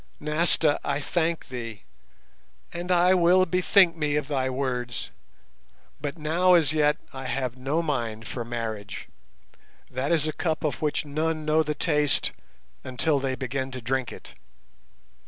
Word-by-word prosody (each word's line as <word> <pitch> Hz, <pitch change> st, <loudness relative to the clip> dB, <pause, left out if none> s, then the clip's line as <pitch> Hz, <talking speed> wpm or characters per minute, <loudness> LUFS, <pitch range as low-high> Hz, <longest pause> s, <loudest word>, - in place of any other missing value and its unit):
Nasta, 150 Hz, 0 st, +2 dB
I 140 Hz, 0 st, -1 dB
thank 165 Hz, +2 st, -1 dB
thee, 115 Hz, -6 st, -6 dB, 0.9 s
and 175 Hz, +2 st, -4 dB
I 180 Hz, +1 st, +5 dB
will 180 Hz, +1 st, +5 dB
bethink 180 Hz, 0 st, +4 dB
me 150 Hz, -2 st, 0 dB
of 150 Hz, -2 st, -1 dB
thy 135 Hz, -3 st, 0 dB
words, 125 Hz, -3 st, -3 dB, 0.9 s
but 145 Hz, +3 st, -4 dB
now 170 Hz, +4 st, +3 dB
as 155 Hz, -3 st, +3 dB
yet 150 Hz, -1 st, +3 dB, 0.2 s
I 135 Hz, 0 st, -7 dB
have 130 Hz, -1 st, -2 dB
no 140 Hz, +6 st, -1 dB
mind 115 Hz, -7 st, -2 dB
for 120 Hz, -, -4 dB
marriage, 110 Hz, -4 st, -5 dB, 0.8 s
that 130 Hz, +4 st, -2 dB
is 155 Hz, -2 st, +2 dB
a 155 Hz, -, -2 dB
cup 160 Hz, -2 st, -2 dB
of 150 Hz, -, -2 dB
which 150 Hz, 0 st, 0 dB
none 155 Hz, +2 st, -2 dB
know 155 Hz, +1 st, +3 dB
the 150 Hz, -1 st, -2 dB
taste 150 Hz, -2 st, +2 dB, 0.5 s
until 140 Hz, +3 st, +1 dB
they 135 Hz, -1 st, -1 dB
begin 130 Hz, 0 st, -3 dB
to 130 Hz, -1 st, -6 dB
drink 130 Hz, +2 st, -1 dB
it. -, -, -11 dB
145 Hz, 150 wpm, -26 LUFS, 130-160 Hz, 0.9 s, I